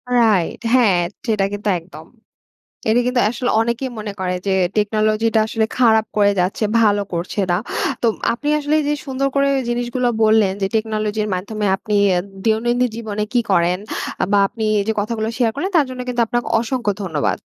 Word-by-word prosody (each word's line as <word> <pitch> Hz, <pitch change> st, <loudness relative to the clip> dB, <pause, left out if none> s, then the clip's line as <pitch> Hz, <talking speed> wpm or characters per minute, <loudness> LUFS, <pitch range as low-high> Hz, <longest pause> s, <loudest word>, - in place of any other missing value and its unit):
Right. 215 Hz, -8 st, +2 dB
হ্যাঁ, 220 Hz, -8 st, +4 dB, 0.3 s
সেটা 215 Hz, -4 st, +1 dB
কিন্তু 205 Hz, +1 st, -2 dB
একদম। 160 Hz, -2 st, -13 dB, 0.8 s
এটা 225 Hz, +3 st, +4 dB
কিন্তু 250 Hz, 0 st, +1 dB
আসলে 245 Hz, +1 st, -2 dB
অনেকেই 235 Hz, +3 st, -1 dB
মনে 210 Hz, -1 st, -5 dB
করে 180 Hz, -1 st, -1 dB
যে 195 Hz, -, +1 dB, 0.2 s
টেকনোলজি 215 Hz, +1 st, +1 dB
টা 220 Hz, -, +5 dB
আসলে 220 Hz, 0 st, 0 dB
খারাপ 220 Hz, -3 st, +4 dB
করে 205 Hz, -1 st, +4 dB
যাচ্ছে, 185 Hz, +4 st, -1 dB, 0.2 s
ভালো 205 Hz, -2 st, +3 dB
করছে 175 Hz, +4 st, -2 dB
না। 175 Hz, -, +3 dB, 0.5 s
তো -, -, +2 dB, 0.3 s
আপনি 275 Hz, +5 st, -4 dB
আসলে 295 Hz, +1 st, -1 dB
এই 300 Hz, -, -3 dB
যে 295 Hz, -, +2 dB
সুন্দর 270 Hz, 0 st, -1 dB
করে 275 Hz, 0 st, +3 dB, 0.2 s
জিনিসগুলা 240 Hz, +1 st, 0 dB
বললেন 215 Hz, -3 st, +4 dB
যে -, -, +3 dB
টেকনোলজির 215 Hz, -1 st, -1 dB
মাধ্যমে 210 Hz, +3 st, -3 dB
আপনি 210 Hz, +1 st, -4 dB, 0.2 s
অ্যা 175 Hz, -, +2 dB, 0.2 s
দৈনন্দিন 240 Hz, +3 st, +2 dB
জীবনে 210 Hz, -2 st, -4 dB
কী 245 Hz, -, +3 dB
করেন, 175 Hz, -1 st, +2 dB, 0.4 s
আ -, -, +4 dB
বা 205 Hz, -, +5 dB
আপনি 225 Hz, -, -7 dB, 0.2 s
এই 200 Hz, -, -1 dB
যে -, -, +3 dB
কথাগুলো 220 Hz, +1 st, -2 dB
শেয়ার 240 Hz, -3 st, +3 dB
করলেন, 370 Hz, +7 st, -2 dB
তার 295 Hz, -4 st, +4 dB
জন্য 255 Hz, 0 st, -7 dB
কিন্তু 245 Hz, -1 st, -1 dB
আপনাকে 240 Hz, +2 st, -1 dB, 0.2 s
অসংখ্য 235 Hz, -3 st, -1 dB
ধন্যবাদ। 160 Hz, -6 st, -1 dB
220 Hz, 180 wpm, -19 LUFS, 205-240 Hz, 0.8 s, টা